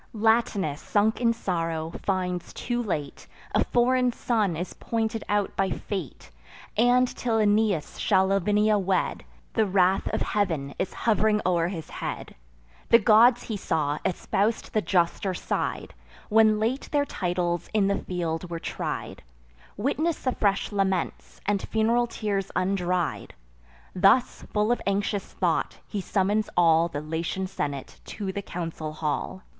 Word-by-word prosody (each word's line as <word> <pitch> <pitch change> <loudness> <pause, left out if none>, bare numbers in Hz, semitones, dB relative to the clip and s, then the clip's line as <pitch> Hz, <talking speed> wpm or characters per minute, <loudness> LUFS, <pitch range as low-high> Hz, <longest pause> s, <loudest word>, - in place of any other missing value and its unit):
Latinus, 215 -8 +1
sunk 215 +3 +1
in 235 -1 +4
sorrow, 165 -7 -2
finds 180 -2 -2
too 240 0 -2
late, 155 -10 -4 0.3
A - - +3
foreign 250 +1 +2
son 215 -8 0
is 175 +3 -4
pointed 225 -1 -2
out 205 -1 0
by 195 -1 +1
fate; 185 - -5 0.4
And, 245 +3 +4
till 235 -2 -1
Aeneas 210 -5 +1
shall 190 -2 +3
Lavinia 205 +2 +2
wed, 190 -1 0 0.3
The 220 - +2
wrath 190 0 +2
of - - -1
Heav'n 160 -9 -1
is - - -1
hov'ring 215 -1 +3
o'er 170 -2 +2
his 170 -4 -5
head. - - -5 0.6
The 230 - +8
gods, 235 +2 +5
he 220 - -4
saw, 155 -6 -1
espous'd 200 +4 -1
the 215 - +2
juster 185 +1 +1
side, - - -3 0.4
When 215 0 +5
late 235 +5 -1
their 290 -1 +2
titles 175 - -2
in 215 -2 +2
the 200 - +1
field 170 -1 -3
were 170 - -3
tried: - - -5 0.6
Witness 295 +8 -1
the 255 - +1
fresh 200 -4 0
laments, 195 -3 -2
and 200 -1 +1
fun'ral 230 +2 +1
tears 200 -4 -2
undried. 180 - -1 0.6
Thus, 195 +7 +3
full 210 +2 +1
of 240 - 0
anxious 200 0 0
thought, - - 0
he 205 - -3
summons 205 +3 0
all 165 -1 +5
The 145 -3 -5
Latian 165 +4 -3
senate 145 -6 -5
to 200 -3 -4
the 200 - -4
council 165 -4 -5
hall. 155 +4 -3
195 Hz, 140 wpm, -26 LUFS, 175-220 Hz, 0.6 s, The